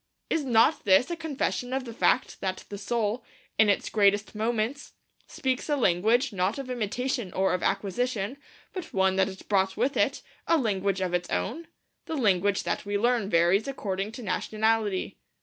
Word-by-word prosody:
Is 320 - +1
not 245 +3 +3
this 200 - +4
a - - -1
confession 280 -5 -2
of 265 -1 -1
the 230 - -7
fact 250 - +1
that 190 -1 -3
the 205 - -6
soul, 220 +2 -1 0.4
in 220 -1 +6
its 200 - +1
greatest 205 0 +2
moments, 225 +5 -2 0.3
speaks 260 +2 -2
a 295 - +3
language, 230 +4 +2
not 190 +4 0
of 270 -2 -5
imitation 240 -2 -2
or 190 0 +1
of 180 - -1
acquisition, 205 +4 -1 0.4
but 365 - -7
one 190 0 +3
that 190 0 +3
it 190 0 -11
brought 190 -2 +1
with 275 +3 +1
it, - - +1 0.2
a 330 - +4
language 200 - 0
of 180 -1 -1
its 175 0 -1
own? 335 0 -2 0.4
The 320 - -3
language 200 -4 +2
that - - -2
we 205 0 -1
learn 235 -2 +1
varies 175 +6 +3
according 200 -5 -3
to 245 - -8
nationality. 215 +1 0
215 Hz, 175 wpm, -27 LUFS, 195-250 Hz, 0.4 s, in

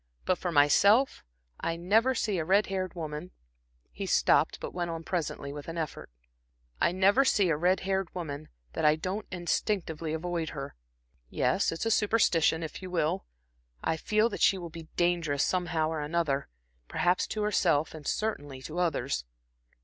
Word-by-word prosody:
But 185 - +1
for 175 - -2
myself 200 - +4 0.4
I 165 - -1
never 220 +9 +2
see 205 -6 0
a - - 0
red 195 +6 +3
haired 185 -2 -3
woman" 155 +1 -5 0.6
He - - -5
stopped, - - +3
but - - -6
went 175 -1 -2
on 165 0 -5
presently 160 -5 -3
with 145 -1 -8
an 165 0 -5
effort. 160 - -4 0.7
"I - - +3
never 195 +8 +4
see 205 -8 +3
a 160 - +3
red 180 +5 +2
haired 190 -1 -1
woman, 155 -4 -5 0.2
that - - -3
I 150 0 +5
don't 185 +6 -4
instinctively 175 -3 -2
avoid 165 0 -2
her. 140 -1 -6 0.6
Yes, - - +1
it's 165 +6 -4
a - - +2
a - - 0
superstition, 190 -7 +3
if 160 - -6
you 185 - -7
will. 180 +1 -1 0.6
I 160 - +1
feel 215 +7 +2
that - - -6
she 195 - +5
will 170 -3 -7
be 165 0 -9
dangerous, 170 -5 +1
somehow 170 -4 0
or 160 -1 -2
another, 150 -2 -1 0.4
perhaps 175 - +1
to 215 - -2
herself, 170 -7 +2
and 155 -3 -9
certainly 145 -11 -2
to 160 +5 -5
others." 140 - 0
170 Hz, 170 wpm, -29 LUFS, 155-190 Hz, 0.7 s, I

